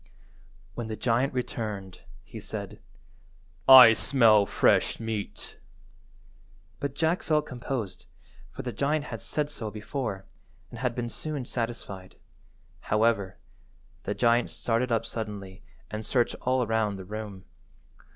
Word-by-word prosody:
When 120 - -5
the 110 - -4
giant 125 +4 +1
returned, 105 -7 -4 0.2
he - - -10
said— - - -7 0.9
"I 125 -4 +11
smell 110 -4 +4
fresh - - +2
meat," 110 -2 -5 1.2
but 140 -1 -3
Jack 165 +3 +1
felt 150 -1 +1
composed, 120 -6 -5 0.4
for - - -8
the 125 - -3
giant 145 +4 0
had - - -6
said 150 -1 -2
so 110 -7 -5
before, 105 -2 -4 0.5
and - - -9
had 125 -2 -1
been 120 -1 -2
soon 145 +2 -4
satisfied; 115 -6 -5 0.6
however, 105 -2 +1 0.6
the - - -3
giant 120 0 +3
started 120 +2 -1
up 115 0 +1
suddenly 105 -5 -6 0.3
and 110 +1 -4
searched 120 +2 +1
all 130 0 +1
round 110 -2 0
the 95 - -8
room. 105 -1 -7
115 Hz, 125 wpm, -27 LUFS, 105-130 Hz, 1.2 s, I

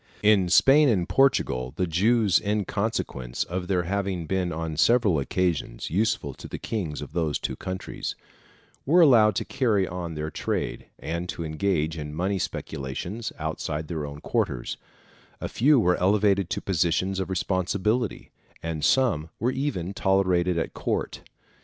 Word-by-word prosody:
In 100 -4 +4
Spain 140 +9 +6
and 105 -6 +2
in - - -2
Portugal, 65 - +2
the 90 - 0
Jews, 100 +4 +3
in 105 -1 -1
consequence 100 - -2
of 90 +1 -4
their 90 -2 +1
having 95 -1 -2
been 90 +1 -1
on 80 0 -4
several 105 -2 +3
occasions 80 -3 -2
useful 90 -7 0
to - - -10
the - - -6
kings 85 -10 -4
of 75 - -11
those 80 -4 0
two - - -4
countries, 95 0 -5 0.7
were 170 +6 +5
allowed 115 - +6
to - - -1
carry 110 -8 +1
on 85 -2 -5
their 75 +1 -4
trade, - - -3
and 85 +2 -4
to 85 - -4
engage 80 -1 -1
in 75 0 -6
money 95 +4 -1
speculations, 85 - -4
outside 75 0 -4
their 80 -3 -3
own 70 +1 -9
quarters; - - -1 0.6
a - - -3
few 140 +3 +4
were 90 -4 +3
elevated 100 -1 +3
to - - -2
positions 95 +1 0
of 95 - -3
responsibility, 95 +5 -1 0.3
and 80 -2 -3
some 80 - +2
were 120 +4 +1
even 100 - -2
tolerated 90 -3 +2
at 80 - -2
court. - - -3
95 Hz, 155 wpm, -26 LUFS, 80-105 Hz, 0.7 s, Spain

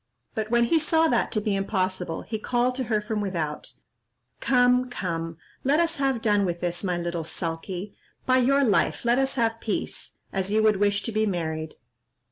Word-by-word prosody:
But 220 0 -3
when 235 0 +4
he 320 +8 +3
saw 320 +1 +3
that 240 - +1
to 215 - +2
be 210 -1 0
impossible, 185 -3 -1
he 220 -1 -4
called 245 +2 +1
to 260 0 -3
her 215 -2 +1
from 210 0 -2
without, 165 -7 -3 0.7
"Come, 250 0 +3
come, 165 -7 -4 0.3
let 285 +4 +3
us 335 0 +1
have 270 -4 0
done 205 -2 +3
with 175 -2 -1
this, 175 +1 -2
my 180 -2 0
little 170 -1 -3
sulky; 175 +4 -4 0.3
by 255 0 +4
your 275 +3 +4
life, 220 0 +2
let 240 +2 +4
us 270 0 0
have 230 -2 +1
peace, 215 - -4 0.2
as 195 0 -1
you 215 +1 +3
would 215 -2 +4
wish 205 0 +1
to 230 - -3
be 215 0 +1
married." 160 -4 -3
215 Hz, 190 wpm, -26 LUFS, 180-245 Hz, 0.7 s, when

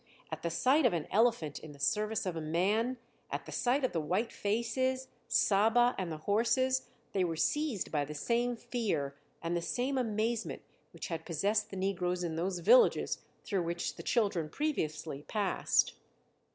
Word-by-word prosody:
At 160 0 -4
the 170 - -1
sight 260 - +4
of 225 - 0
an 165 -3 -1
elephant 205 - +2
in 155 -2 -10
the 140 - -16
service 215 +6 0
of 180 -3 -2
a 160 - -3
man, 200 +11 +1 0.3
at - - -4
the - - -9
sight 255 +3 +1
of - - -1
the 165 - -1
white 190 +9 -1
faces, 255 +5 -1 0.2
Saba, 235 +1 +4
and 185 -3 -3
the 155 - -4
horses, 255 +5 +2 0.2
they 190 - +1
were 165 -2 -1
seized 285 - 0
by 150 -2 +1
the 150 +1 -6
same 240 +9 0
fear 215 - -2 0.3
and 165 +1 -1
the 170 - 0
same 260 +8 -1
amazement 225 0 -1 0.3
which - - -7
had 165 -2 -3
possessed 205 +7 0
the 195 - -7
negroes 180 -2 -1
in 165 -2 -2
those 180 +2 -2
villages - - +5 0.2
through 195 -3 0
which 170 +1 -2
the - - -8
children 200 -9 +1
previously 155 - -2
passed. 205 -3 +1
205 Hz, 175 wpm, -32 LUFS, 170-240 Hz, 0.3 s, villages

